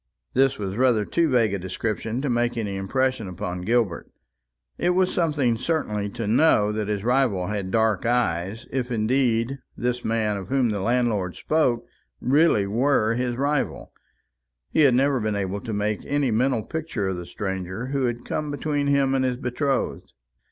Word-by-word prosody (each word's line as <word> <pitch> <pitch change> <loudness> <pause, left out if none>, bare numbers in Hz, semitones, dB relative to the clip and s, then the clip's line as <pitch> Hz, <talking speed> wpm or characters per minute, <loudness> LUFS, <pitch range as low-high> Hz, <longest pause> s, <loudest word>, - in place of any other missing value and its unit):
This 135 0 +3
was 100 -1 -4
rather 120 -4 +3
too 165 +6 +1
vague 115 -6 +3
a 100 - -1
description 110 +6 -3
to - - 0
make 120 0 0
any 105 -4 -2
impression 130 +3 -1
upon 90 0 -5
Gilbert. 110 -3 0 0.7
It 180 0 +2
was 185 0 +2
something 145 -9 +1
certainly 110 -7 -1
to 115 +2 -5
know 105 -2 +4
that 105 -1 -2
his 105 -2 -2
rival 120 -7 +2
had 100 -3 -3
dark 110 -1 +1
eyes, 110 -4 0
if 130 -1 -2
indeed 120 +2 +1 0.2
this 125 0 -1
man 110 -2 0
of 95 - -7
whom 130 -3 +2
the 105 -2 -1
landlord 110 -4 0
spoke 150 -7 +1 0.3
really 140 -6 +3
were 115 +1 +2
his 125 0 -1
rival. 140 +2 -1 0.8
He - - 0
had 140 -5 +6
never 135 +1 +3
been 110 -2 -1
able 100 0 -2
to 115 - -5
make 105 0 -1
any 145 -3 +1
mental 120 0 +1
picture 155 -12 -3
of 95 - -3
the 90 -1 -7
stranger 95 +5 -4
who 135 -1 0
had 120 0 -3
come 150 -1 -2
between 145 0 -1
him 140 -1 +3
and 135 -1 +2
his 125 -1 0
betrothed. 135 - -2
120 Hz, 175 wpm, -24 LUFS, 105-135 Hz, 0.8 s, had